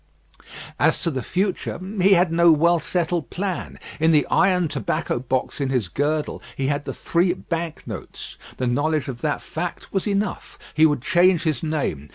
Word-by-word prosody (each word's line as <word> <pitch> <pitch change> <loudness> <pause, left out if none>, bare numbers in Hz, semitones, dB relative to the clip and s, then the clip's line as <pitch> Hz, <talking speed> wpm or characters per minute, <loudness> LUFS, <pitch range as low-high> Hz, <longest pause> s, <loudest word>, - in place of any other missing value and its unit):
As - - +3
to 165 - +1
the 130 -3 -3
future, 185 - -2 0.2
he 195 +2 +6
had 175 -2 +3
no 170 0 +5
well 170 +2 +4
settled 170 0 -1
plan. 190 -1 -4 0.2
In 160 +1 +4
the 150 -3 +4
iron 180 -3 +3
tobacco 135 -3 -2
box 130 +3 -2
in 135 - 0
his 125 -9 0
girdle 150 - -1
he 135 - -2
had 145 +1 -1
the - - -4
three 175 +1 +1
bank 170 -3 -5
notes. - - -8 0.2
The 130 - -1
knowledge 145 +4 0
of 125 -3 -6
that 150 -2 -1
fact 170 +2 -5
was 195 +1 0
enough. 200 -1 -2 0.2
He 155 +1 +5
would 145 -5 -1
change 180 0 +4
his 155 -7 0
name. 145 - -2
160 Hz, 180 wpm, -23 LUFS, 140-175 Hz, 0.2 s, he